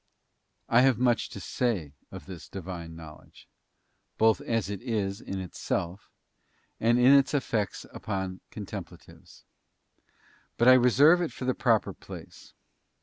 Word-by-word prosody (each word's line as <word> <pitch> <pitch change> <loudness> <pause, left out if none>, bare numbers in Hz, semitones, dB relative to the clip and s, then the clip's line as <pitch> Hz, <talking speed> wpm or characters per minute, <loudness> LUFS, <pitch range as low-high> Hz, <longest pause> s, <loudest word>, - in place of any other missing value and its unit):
_ - - -49 0.6
I 120 - +5
have 130 -3 +4
much 120 -1 +1
to - - -8
say 95 - -2 0.2
of - - -9
this 90 -5 -10
Divine 85 -3 -7
Knowledge, 80 -2 -13 0.7
both 110 0 +3
as 115 -4 -1
it 100 -2 -5
is 100 -4 -2
in 95 - -5
itself, 90 +1 -4 0.7
and 115 +2 +3
in 125 +3 +6
its 140 +1 +4
effects 110 -7 -2
upon 95 -3 -4
contemplatives; - - -10 1.1
but 120 - +3
I 130 - +10
reserve 135 +7 +5
it 170 - -2
for 125 - -6
its 130 - -1
proper 115 -4 +2
place. - - -12
110 Hz, 140 wpm, -28 LUFS, 95-125 Hz, 1.1 s, I